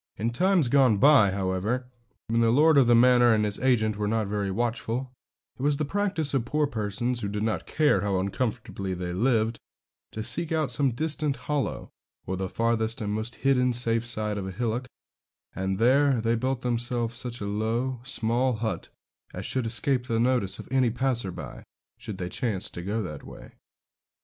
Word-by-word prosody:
In 115 +3 -1
times 180 +3 +2
gone 130 -4 +4
by, 135 -4 +6
however, 95 +6 -1 0.4
when 115 +1 +1
the 115 - +3
lord 150 +6 +5
of 135 -4 +5
the 120 - +6
manor 120 -1 +5
and 105 0 +1
his 105 -1 +1
agent 110 -5 +1
were 105 -1 -1
not 110 0 0
very 100 0 -2
watchful, 120 +4 -2 0.5
it - - -6
was 145 +1 +1
the 155 - -1
practice 185 -3 -1
of 135 -4 +1
poor 150 +5 0
persons, 120 0 -2
who 105 - -3
did 105 +1 -3
not 110 -5 -2
care 150 -11 +2
how 100 -1 0
uncomfortably 100 -1 -3
they 90 0 -4
lived, 115 +2 +1 0.5
to 110 - -4
seek 165 +8 0
out 155 -5 +1
some 135 +3 +2
distant 150 +2 -1
hollow, 145 -3 -2 0.4
or 95 - -3
the 95 0 -3
farthest 115 +2 0
and 105 -2 -2
most 110 +2 -4
hidden 125 -2 +3
side 115 -3 0
of 95 - -5
a - - -4
hillock, 120 +4 -2 0.7
and 95 0 -2
there 130 +3 +3 0.2
build 130 +2 -2
themselves 120 -1 -1
such 120 0 -4
a 100 - -4
low, 115 +5 -1
small 125 0 0
hut, 110 0 -4 0.5
as - - -5
should 130 -3 -1
escape 125 +3 0
the 115 -2 0
notice 120 -6 +1
of - - -9
any 130 -2 +3
passer 120 -4 -1
by, - - -9 0.4
should 110 -5 -7
they 90 -2 -4
chance 105 0 -1
to 85 - -6
go 105 +5 -2
that 75 -6 -7
way. - - -12
115 Hz, 185 wpm, -26 LUFS, 105-130 Hz, 0.7 s, by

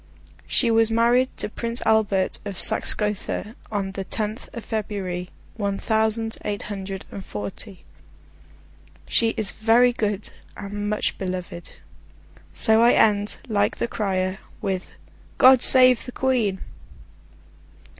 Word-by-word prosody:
She 235 - +3
was 225 0 +4
married 240 +3 +3
to - - 0
Prince 230 +2 -3
Albert 205 -4 +2
of 200 -3 -6
Saxe - - +3
Gotha 210 +1 -3 0.2
on 195 -2 -2
the 195 0 -5
tenth 215 +3 -4
of 235 - -8
February, 190 -5 -4 0.3
one 200 -2 -1
thousand 220 +1 0
eight 205 -1 -3
hundred 195 -2 -6
and 195 - -7
forty. 140 - -6 1.2
She 225 -1 +1
is 210 -3 0
very 235 +3 +3
good, 210 -3 -2 0.3
and 205 +1 -4
much 210 - -1
beloved. 180 -2 -6 0.8
So 220 -1 +3
I 235 +1 +6
end, 205 -1 +2
like 205 -1 0
the - - -1
crier, 190 -3 -2 0.2
with 185 -1 -4 0.4
God 260 -1 +7
Save 255 -2 +6
the - - -5
Queen! 240 -8 0
210 Hz, 125 wpm, -23 LUFS, 195-225 Hz, 1.2 s, God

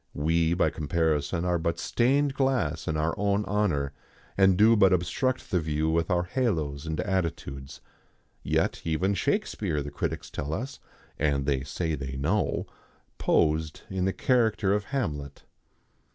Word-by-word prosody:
We 80 +3 +2
by 90 - +2
comparison 80 +1 0
are 90 -1 +1
but 85 +1 -1
stained 135 +4 +2
glass 125 - 0
in 80 - 0
our 80 +2 0
own 100 0 +1
honour, 90 -9 0 0.4
and 95 -2 +4
do 110 +3 +6
but 100 -3 +5
obstruct 130 +9 0
the 90 - +3
view 80 0 0
with 85 +1 0
our 90 0 +2
halos 80 - -1
and 80 -1 -3
attitudes. 80 -8 -3 0.6
Yet - - 0
even 85 +5 0
Shakespeare, 100 - -1
the 70 - -7
critics - - -4
tell 75 +3 -3
us 130 +7 -5 0.4
and 70 -2 +1
they 70 -2 0
say 80 +4 -2
they 70 -2 -4
know 85 +10 0 0.5
posed 80 0 +1
in 95 -1 0
the 95 - +2
character 110 -6 +2
of 105 0 0
Hamlet. 75 - -3
85 Hz, 150 wpm, -27 LUFS, 75-105 Hz, 0.6 s, do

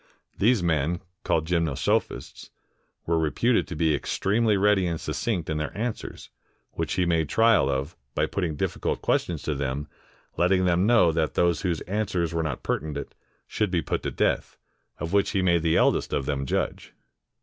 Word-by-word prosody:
These 110 -2 +3
men, 85 +1 +1 0.2
called 80 -1 +1
Gymnosophists, 85 -4 -1 0.6
were 85 0 +1
reputed 95 - +1
to 85 - -6
be 80 0 +2
extremely 105 - +1
ready 100 -2 +3
and 85 -2 -2
succinct 95 -9 -2
in 80 - -2
their 75 +5 -4
answers, 115 +1 -5 0.4
which - - -3
he 90 - +1
made 80 -3 +1
trial 115 -10 +4
of, 70 +5 -2 0.2
by - - +2
putting 85 -6 -2
difficult - - -2
questions 85 -4 0
to 75 - -1
them, 70 +1 -3 0.5
letting 90 +1 +3
them 90 +2 +2
know 115 -8 +5
that 80 -1 -1
those 85 -2 +2
whose 85 -4 -1
answers 90 -4 -1
were 85 - 0
not 75 -6 -3
pertinent, 70 -1 -3 0.3
should 105 -2 -1
be 85 -3 0
put - - -2
to - - -2
death, - - -1 0.4
of 85 +3 -5
which 100 -1 +3
he 95 - +1
made 85 -2 +3
the 80 0 +2
eldest - - +2
of 70 - 0
them 70 -2 -2
judge. - - -2
85 Hz, 170 wpm, -26 LUFS, 75-95 Hz, 0.6 s, know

